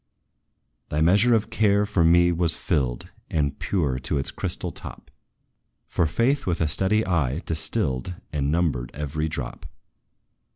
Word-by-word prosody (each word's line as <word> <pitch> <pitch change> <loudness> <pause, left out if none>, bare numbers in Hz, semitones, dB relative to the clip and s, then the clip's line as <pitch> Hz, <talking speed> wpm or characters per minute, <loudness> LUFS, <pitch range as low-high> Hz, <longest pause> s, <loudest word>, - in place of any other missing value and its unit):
"Thy 75 - -1
measure 100 +9 +4
of 110 +1 -1
care 105 -2 +2
for 100 -4 +1
me 85 +1 +5
was 85 -1 +5
filled, 60 -3 -2 0.2
And 70 -3 -1
pure 75 -10 -1
to 65 - -2
its 70 - -2
crystal - - -3
top; - - -6 0.8
For 85 - 0
Faith, 120 - 0
with 85 -2 0
a 80 - +1
steady 95 +8 +2
eye, 80 -5 -1
distilled 80 - -1 0.2
And 70 -1 -1
numbered 75 -7 0
every 75 +2 -3
drop. 70 -6 -6
80 Hz, 140 wpm, -24 LUFS, 70-95 Hz, 0.8 s, me